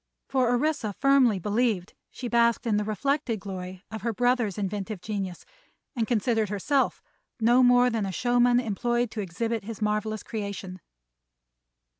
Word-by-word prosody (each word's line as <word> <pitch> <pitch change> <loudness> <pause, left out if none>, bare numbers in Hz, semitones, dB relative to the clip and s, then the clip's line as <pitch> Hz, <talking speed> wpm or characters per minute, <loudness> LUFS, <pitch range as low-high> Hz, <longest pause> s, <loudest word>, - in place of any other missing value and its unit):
For 260 -3 +2
Orissa 245 -3 0
firmly 265 -3 +4
believed 210 -1 0 0.2
she 250 - -6
basked 235 0 +2
in 215 -3 +2
the 210 - 0
reflected 235 +2 -1
glory 185 -1 -7
of 220 - -6
her 230 - -1
brother's 245 -3 +1
inventive 205 0 -3
genius, 195 -2 -5 0.5
and 230 -3 0
considered 225 -2 +1
herself 260 +8 0 0.4
no 240 +3 +5
more 245 0 +5
than 220 -3 -1
a - - -3
showman 245 +3 +3
employed 240 +1 -1
to 215 - -3
exhibit 220 +5 -3
his 220 +1 -7
marvelous 215 0 -1
creation. 200 -4 -6
225 Hz, 145 wpm, -27 LUFS, 205-245 Hz, 0.5 s, no